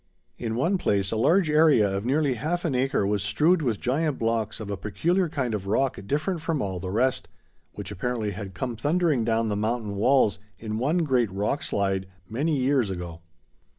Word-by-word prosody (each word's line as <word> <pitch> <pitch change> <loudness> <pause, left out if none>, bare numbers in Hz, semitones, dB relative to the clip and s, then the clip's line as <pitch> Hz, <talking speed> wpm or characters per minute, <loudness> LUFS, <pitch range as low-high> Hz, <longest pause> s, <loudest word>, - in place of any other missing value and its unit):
In 115 -2 -3
one 170 +10 +1
place 100 - 0
a - - -1
large 160 - +3
area 150 -8 +5
of 100 +2 -3
nearly 140 +1 +2
half 160 +9 -2
an 155 - 0
acre 130 -3 +1
was 100 0 0
strewed 155 - +2
with 120 -8 -1
giant 145 +3 0
blocks 115 -1 -1
of 105 -2 -6
a - - -1
peculiar 160 - 0
kind 130 -6 -2
of 100 -2 -4
rock 130 +6 +1
different 155 - -1
from 165 -2 -1
all 95 -6 -3
the 90 - -5
rest, 125 +6 0 0.5
which - - -7
apparently 110 +1 -2
had 95 -1 -7
come 120 +5 -3
thundering 150 +1 +1
down 115 0 +1
the 105 - -1
mountain 110 0 -2
walls 110 -2 +3 0.2
in 110 +1 -4
one 160 +8 +1
great 125 -7 +2
rock 105 +8 -1
slide 95 -1 -1 0.2
many 145 - 0
years 130 -4 +2
ago. 90 -3 -6
120 Hz, 190 wpm, -26 LUFS, 100-145 Hz, 0.5 s, area